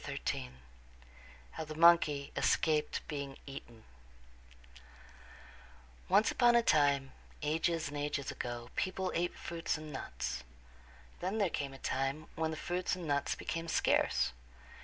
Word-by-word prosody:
XIII - - -3 1.0
How - - -5
the 155 0 -7
Monkey 160 -4 +5
Escaped 155 -2 +1
Being 140 -3 -4
Eaten 120 -5 -10 2.3
Once 200 +4 +5
upon 240 -1 +5
a 235 - +5
time, 140 -6 +3 0.3
ages 160 +1 +1
and 145 - -7
ages 145 -1 -2
ago, 120 0 -5
people 185 0 -1
ate 175 +1 0
fruits 165 -1 -2
and 155 -1 -8
nuts. 60 - -4 0.8
Then 190 +4 -2
there 200 -6 +2
came 140 -2 -2
a - - -9
time 135 +4 -1
when 160 0 -1
the 160 - -4
fruits 180 +3 -1
and 180 -2 -6
nuts 145 -1 +1
became 165 0 -4
scarce. 160 - +2
155 Hz, 130 wpm, -34 LUFS, 140-170 Hz, 2.3 s, Monkey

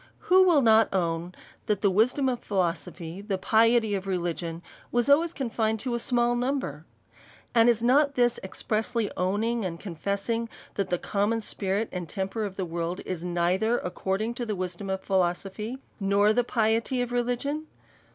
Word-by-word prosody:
Who 375 +1 +8
will 310 -6 +5
not 225 -1 +5
own, 170 -1 -1 0.3
that 210 -2 0
the 200 - +4
wisdom 250 +8 +2
of 250 -2 0
philosophy, 175 -2 -3
the 200 -2 -2
piety 225 +2 +3
of 195 -1 -3
religion, 170 -2 -3 0.3
was 240 0 +2
always 315 +4 +4
confined 225 -6 -1
to 255 -2 -2
a 235 - 0
small 240 0 +2
number? 240 - -2 0.7
And 230 0 +5
is 230 -1 +2
not 280 +3 +4
this 240 -1 +2
expressly 220 +3 -2
owning 215 +5 0
and 170 -3 -4
con 185 -5 -7
fessing, 200 +7 -2 0.2
that 200 - -2
the 180 - +1
common 205 +5 0
spirit 205 0 -1
and 180 -3 -5
temper 200 +2 -2
of 190 -2 -7
the 190 - -1
world, 170 +1 -3
is 180 -3 -4
neither 180 +6 +1
according 195 +5 -2
to 240 0 -4
the 210 - -1
wisdom 185 +1 -4
of 190 0 -3
philoso 185 0 0
phy, 215 +5 -5 0.2
nor 200 +1 +3
the 245 +2 +2
piety 230 +2 +1
of 245 - -6
religion? 245 +6 -1
215 Hz, 170 wpm, -27 LUFS, 185-240 Hz, 0.7 s, Who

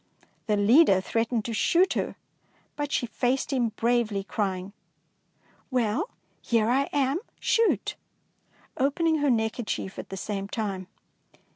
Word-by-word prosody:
The 210 -1 +2
leader 205 - +6
threatened 225 +3 -1
to 230 - -3
shoot 350 - +3
her, - - -2 0.6
but 290 -1 -3
she - - +1
faced 255 +4 -1
him 245 -3 +2
bravely, 230 -4 +1
crying, 195 -1 -3 0.5
— - - -36
"Well, 250 - 0 0.3
here 230 -1 +2
am 275 +2 +2
I; 275 +1 +1 0.2
shoot! 460 -1 +2 0.8
opening 315 +4 +2
her 290 -1 +2
neckerchief 220 -4 -1
at - - -8
the 195 - -6
same 195 0 -3
time. 200 -4 -3
235 Hz, 130 wpm, -27 LUFS, 210-275 Hz, 0.8 s, leader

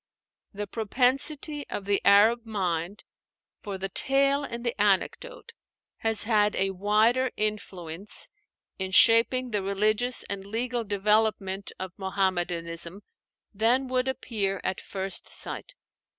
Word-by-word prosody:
The 205 0 -5
propensity 270 +7 0
of 200 - -5
the 200 0 +1
Arab 220 +4 +5
mind 190 -3 -3 0.6
for 200 -3 -5
the 190 +1 -3
tale 275 +7 +3
and 235 -3 -6
the 235 - 0
anecdote 210 - -1 0.5
has 225 -2 +1
had 210 -2 +2
a 195 0 +1
wider 215 +7 +2
influence 200 -4 -3 0.5
in 190 0 -2
shaping 235 +5 +5
the 210 -2 0
religious 215 +5 +1
and 200 -1 -5
legal 235 +4 -2
development, 205 -1 0
of 190 -1 -6
Muhammadanism 175 -2 -2 0.5
than 235 +6 +2
would 255 0 0
appear 205 -7 -2
at 190 - -2
first 190 -2 -3
sight. - - -3
210 Hz, 120 wpm, -27 LUFS, 195-240 Hz, 0.6 s, Arab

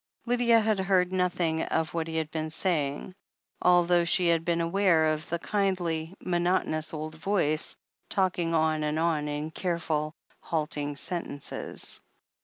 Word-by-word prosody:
Lydia 240 -1 +4
had 215 -2 +1
heard 190 -1 +2
nothing 175 -3 +1
of 160 -1 -1
what 165 -1 -1
he 160 0 -3
had 160 -1 -2
been 155 -1 -3
say 160 -2 0
ing, 145 +6 -7 0.5
although 175 -1 +4
she 170 +1 +2
had 165 -1 +2
been 170 0 0
aware 170 -2 +3
of 155 0 -6
the 170 - 0
kindly, 180 -3 -1
monot 175 +1 +2
onous 155 0 -1
old 155 0 -5
voice, 155 -2 0 0.3
talking 180 -3 +1
on 155 -1 +2
and 150 0 -1
on 160 -2 +1
in 150 +1 -3
careful, 160 -3 -2 0.2
halting 150 -2 -2
sentences. 165 -3 -4
165 Hz, 150 wpm, -28 LUFS, 155-180 Hz, 0.5 s, Lydia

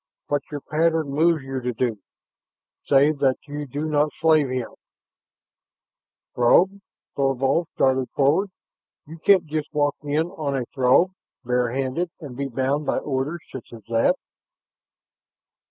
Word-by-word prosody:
"What 145 0 +1
your 145 -2 -5
pattern 160 0 +1
moves 155 +1 +2
you 135 -1 -4
to 125 0 -2
do. 115 -2 -1 0.9
Save 145 +1 +4
that 135 -2 +2
you 145 0 -5
do 145 +4 -4
not 150 -1 +2
slay 160 -1 +4
him 125 -2 -3 0.8
" - - -70
"Throg!" 185 +11 +4 0.4
Thorvald 135 +4 +1
started 130 -1 +2
forward. 150 +9 +2 0.6
"You 160 +2 -11
can't 190 0 +4
just 155 0 -4
walk 145 -1 +1
in 150 +2 0
on 150 -7 -3
a 125 - -2
Throg 135 +7 +4 0.3
barehanded 130 +7 -1
and 145 -7 -9
be 140 +2 -3
bound 135 +3 -1
by - - +1
orders 145 +4 -3
such 130 - -9
as 115 -2 -11
that!" 115 0 +3
145 Hz, 140 wpm, -23 LUFS, 130-155 Hz, 0.9 s, Save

